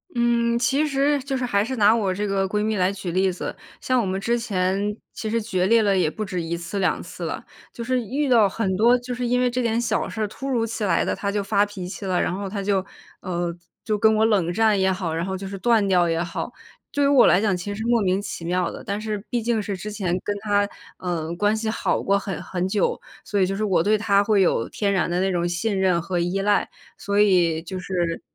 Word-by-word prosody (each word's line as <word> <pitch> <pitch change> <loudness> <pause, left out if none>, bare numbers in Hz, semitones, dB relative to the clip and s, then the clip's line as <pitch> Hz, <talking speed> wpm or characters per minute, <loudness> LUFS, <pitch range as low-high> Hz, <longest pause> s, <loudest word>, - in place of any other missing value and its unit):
嗯， 235 -1 +2
其 275 +5 +2
实 285 +1 +2
就 275 0 -2
是 255 - -1
还 200 -4 +1
是 260 +3 -3
拿 215 -2 +5
我 205 -5 0
这 205 +3 -2
个 195 -1 0
闺 210 +2 -1
蜜 215 0 0
来 185 0 +2
举 190 -3 -5
例 190 +2 +2
子， 180 - -5 0.3
像 255 -1 +1
我 230 - 0
们 190 0 -2
之 235 +4 0
前 200 -1 -1 0.2
其 220 - -4
实 230 +1 0
决 190 -5 0
裂 230 +1 +5
了 200 -2 +2
也 180 -4 +2
不 215 - -5
止 185 -3 -3
1 165 +1 -3
次、 170 +4 -4
2 185 - 0
次 - - -7
了。 - - -4 0.3
就 235 - -6
是 255 +1 0
遇 275 +6 -2
到 230 -5 +6
很 195 -1 -1
多 235 +4 +5
就 245 +1 -5
是 245 0 -3
因 250 +1 +2
为 250 - +3
这 250 +1 -1
点 230 -1 +1
小 240 - 0
事 215 +3 -2
突 270 +6 -7
如 235 -4 +1
其 225 -1 -3
来 185 - +2
地， - - -1
她 200 - -3
就 205 0 -1
发 200 +1 +2
脾 195 -3 -7
气 200 - -7
了， 185 -2 +1
然 - - 0
后 200 +1 -4
她 200 +1 -4
就， 195 -1 +1 0.4
嗯， 175 -2 -3 0.3
就 215 -2 0
跟 220 +1 +4
我 215 +1 +3
冷 195 -6 +2
战 215 0 +3
也 190 0 +3
好， 180 -3 -2
然 165 +2 -1
后 190 0 -3
就 195 - -7
是 195 +1 -6
断 225 +1 +3
掉 180 -2 +4
也 165 0 0
好， 175 +7 -5 0.4
对 285 - +1
于 - - +4
我 280 -2 +6
来 180 - +4
讲 205 -3 +2
其 175 - -6
实 - - -6
是 - - -3
莫 235 -1 +3
名 190 0 +1
其 175 -4 -6
妙 180 +1 0
的。 - - -8
但 200 +1 -2
是 215 -2 -3
毕 240 - -1
竟 225 -1 0
是 200 -1 -3
之 210 +3 -6
前 185 -4 -1
跟 205 - -1
她， 205 -1 +1 0.3
嗯， 170 -2 -3
关 205 +4 +2
系 220 0 -2
好 220 - 0
过 200 0 +2
很 195 -2 -4
很 180 0 -3
久， 200 -1 0 0.3
所 205 -2 0
以 - - +5
就 195 +1 -2
是 215 - -1
我 180 -5 +2
对 215 +3 +3
她 200 -1 +3
会 210 -1 +2
有 145 -10 +1
天 200 -2 -1
然 185 - +1
的 175 +1 0
那 190 +1 +1
种 175 0 0
信 195 +4 -1
任 185 -3 +2
和 180 +2 -3
依 175 +3 0
赖。 205 +1 +2 0.3
所 200 0 -1
以 175 -6 +3
就 180 +3 -6
是 175 -2 -2
200 Hz, 275 characters per minute, -23 LUFS, 185-225 Hz, 0.4 s, 到